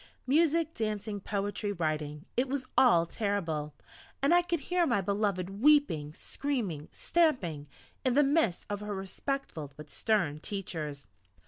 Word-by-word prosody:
Music, 320 +3 +3
dancing, 215 -3 -2
poetry, 205 +1 -2
writing 155 -3 -2
it 255 +1 +1
was 270 -1 -2
all 175 -10 +6
terrible! 165 -7 -2 0.5
and 280 - +5
I 350 - +6
could 345 -3 -2
hear 355 +3 +1
my 235 -5 +2
beloved 200 0 -1
weeping 255 - +4
screaming 210 - -3
stamping, 190 - +1 0.4
in 255 - +2
the 290 - +6
midst 275 - +2
of 205 -1 -3
her 210 -1 -4
respectful 190 - -4
but 150 0 -10
stern 185 -10 +1
teachers. 155 - -5
205 Hz, 135 wpm, -30 LUFS, 165-275 Hz, 0.5 s, all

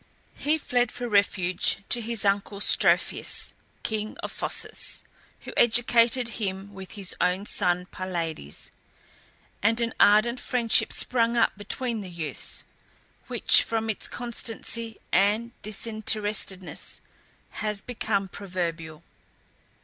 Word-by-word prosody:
He 300 +2 0
fled 245 -5 0
for 245 - -4
refuge 195 -3 +2
to 240 - 0
his 225 -2 +2
uncle 200 0 0
Strophius, - - +2 0.3
king 215 -1 -3
of - - -3
Phocis, - - -2 0.4
who - - -9
educated 240 +1 +4
him 195 0 -3
with 190 0 -9
his 200 -4 -3
own 180 +3 +1
son 180 -3 +1
Pylades, 170 - -4 0.9
and 225 +3 +3
an 230 -1 0
ardent 215 +4 +5
friendship 240 -2 +3
sprung 235 -1 +2
up 230 - +3
between 225 +3 -2
the 190 - -8
youths, 160 -5 -5 0.6
which, - - +7
from 225 -1 0
its 210 - -5
constancy 230 -1 -4
and 210 +5 +2
disinterestedness, 210 -3 -3 0.6
has 210 -2 -1
become 215 -5 -1
proverbial. 170 -5 -5
210 Hz, 110 wpm, -26 LUFS, 190-230 Hz, 0.9 s, which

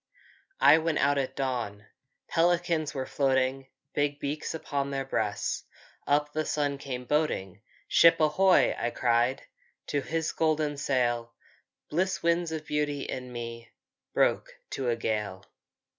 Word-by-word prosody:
I 155 - +7
went 160 -1 0
out 145 0 +3
at 130 -1 -3
dawn, 120 -7 -3 0.4
Pelicans 170 -2 +1
were 130 -1 -2
floating, 130 -1 0 0.3
Big 145 0 0
beaks 145 +3 -3 0.2
on 140 -1 0
their 135 -1 -2
breasts; 105 -6 -2 0.4
Up 150 +1 +2
the 155 - 0
sun 145 -2 -1
came 125 -3 -5
boating. 120 - -1 0.3
"Ship 165 - +6
ahoy!" 180 +5 +4
I 120 - 0
cried, 120 +1 +1 0.5
To 145 - 0
his 160 +3 -2
golden 155 -2 0
sail. 120 -4 0 0.5
Bliss 185 +3 -1
winds 170 0 +1
of 155 -1 -4
beauty 150 -2 -1
in 125 -1 -5
me 115 -1 -7 0.4
Broke - - +2 0.2
to 130 -2 -2
a 120 - +2
gale! 105 -4 -3
140 Hz, 135 wpm, -28 LUFS, 125-155 Hz, 0.5 s, I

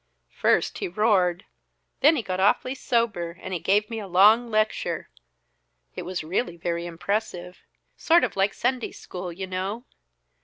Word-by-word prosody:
"First - - +1
he 395 - -2
roared; 200 - +1 0.5
then 305 +3 +6
he 250 - -2
got 185 -2 -3
awfully 210 +6 +2
sober, 220 -10 -1
and 190 - -6
he 175 - -1
gave 200 +5 +2
me 225 -2 -5
a 205 - -7
long 210 +6 +5
lecture 215 0 -1 0.8
it - - -4
was 185 -2 -4
really 175 +2 -2
very 170 0 -3
impressive 180 0 -3 0.4
sort 335 +2 +4
of - - -1
like 195 +1 +1
Sunday 255 -2 -1
School, 180 -1 -7
you 190 +3 -5
know. 190 +6 -4
195 Hz, 155 wpm, -25 LUFS, 180-225 Hz, 0.8 s, then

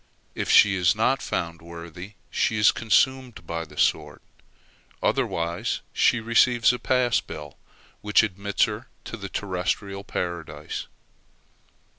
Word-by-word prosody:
If - - -4
she 100 -1 +7
is 90 -2 +2
not 115 +4 +1
found 85 -1 -3
worthy, 85 +3 -10 0.2
she 110 - 0
is 105 - +6
consumed 125 -2 +1
by 85 0 -4
the - - -16
sword; - - +1 0.8
otherwise 85 +1 -1
she 125 - +3
receives 115 +1 +4
a 125 - -4
pass 125 -2 +2
bill, 75 -2 -9 0.5
which 105 +2 +4
admits 100 0 0
her 105 +3 -2 0.2
to - - -7
the 100 -3 -7
terrestrial 100 +1 -3
Paradise. 85 -6 -5
100 Hz, 125 wpm, -25 LUFS, 85-115 Hz, 0.8 s, she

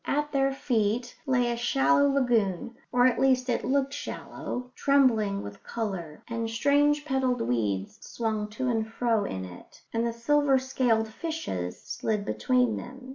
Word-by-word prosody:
At 295 +1 0
their 275 -1 +2
feet 240 -2 -1
lay 245 -2 +2
a - - -1
shallow 275 +5 +3
lagoon 235 -6 +1 0.2
or 245 0 +4
at 250 -2 +3
least 260 -1 +3
it 240 - 0
looked 275 +1 +1
shallow 250 -3 -6
trembling 235 -9 +2
with 100 - -9
colour; 190 -9 -5
and 230 -1 -3
strange 290 +5 +2
petalled 265 -3 0
weeds 105 -5 -1
swung 220 -2 -2
to 240 +5 -4
and 220 -2 -1
fro 225 -3 +1
in 95 - -4
it, 90 -1 -13
and 230 +1 +1
the - - -1
silver 275 +4 +3
scaled 255 -4 +1
fishes 220 - -4
slid 210 -2 -2
between 250 -1 +1
them. 260 +1 -9
245 Hz, 155 wpm, -27 LUFS, 220-270 Hz, 0.2 s, or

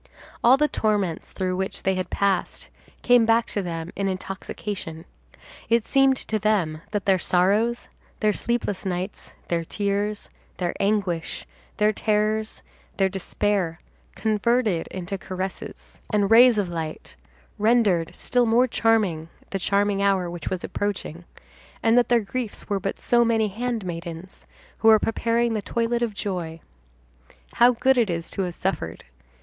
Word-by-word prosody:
All 250 +3 +7
the 300 +1 +3
torments 205 - -1
through 185 -1 -2
which 190 0 -3
they 190 - +2
had 185 -1 -3
passed 200 -1 -1 0.3
came 245 -1 +5
back 225 +1 +3
to 205 - -1
them 165 -2 -5
in 195 0 -1
intoxication. 190 -3 -5 0.6
It 230 -1 +3
seemed 270 -1 +3
to 220 -2 -2
them 190 -7 0
that 205 -2 -3
their 190 -2 +3
sorrows, 205 +8 +1 0.3
their 215 -1 +2
sleepless 235 -5 -2
nights, 185 +1 -5
their 170 -1 0
tears, 205 +3 -2 0.3
their 175 -2 -1
anguish, 195 -5 -1 0.3
their 210 0 +3
terrors, 215 +1 0 0.3
their 195 -1 +3
despair, 190 -2 -1 0.4
converted 220 -4 +1
into 190 +1 -5
caresses 190 0 -7
and 205 -1 +1
rays 240 0 +7
of 205 -3 +1
light, 165 -2 -6 0.4
rendered 210 -7 +2
still 245 -1 +1
more 235 +3 +4
charming 210 -9 +1 0.2
the 195 - -2
charming 200 +1 +1
hour 190 -3 +1
which 170 -3 -5
was 185 -1 -3
approaching; 185 -4 -4 0.6
and 225 0 +4
that 245 -2 +4
their 240 -1 +4
griefs 225 +1 -5
were 200 -1 0
but 195 +1 -4
so 240 0 +3
many 225 -2 +2
handmaidens 185 -6 -5 0.3
who 225 - +2
were 220 -1 +9
preparing 230 +1 0
the 215 - -1
toilet 235 +3 -1
of 230 -3 -1
joy. 175 -5 -4 1.0
How 240 +1 +6
good 260 +2 +3
it 225 -4 +2
is 170 -1 -3
to - - -2
have 180 -2 -3
suffered! 85 - -3
205 Hz, 145 wpm, -24 LUFS, 185-225 Hz, 1.0 s, were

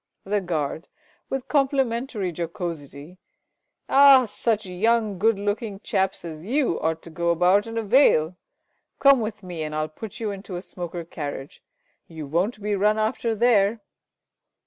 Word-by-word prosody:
The 205 +1 -1
Guard 160 -3 -3 0.4
(with 270 -1 -3
complimentary 260 - 0
jocosity). 165 -1 -6 0.7
Ah, 275 -2 +7
such 215 0 -1
young 210 +2 0
good 220 +1 +3
looking 205 0 -3
chaps 190 -2 -1
as 160 -1 -8
you 250 - 0
ought 160 0 -2
to 165 - -11
go 170 +2 -1
about 180 +5 +3
in 225 0 -6
a 225 - -1
veil. 195 - +4 0.6
Come 275 -3 +5
with 215 -1 -5
me, 175 -3 -6
and 155 0 -4
I'll 155 0 -1
put 200 +6 -9
you 220 -3 -2
into 195 -1 -7
a 175 - -4
smoker 175 -1 -6
carriage. 145 -3 -7 0.5
You 160 -2 -8
won't 190 - -1
be 210 0 0
run 210 +2 +2
after 225 +1 -1
there! 220 -1 +3
200 Hz, 150 wpm, -24 LUFS, 170-225 Hz, 0.7 s, Ah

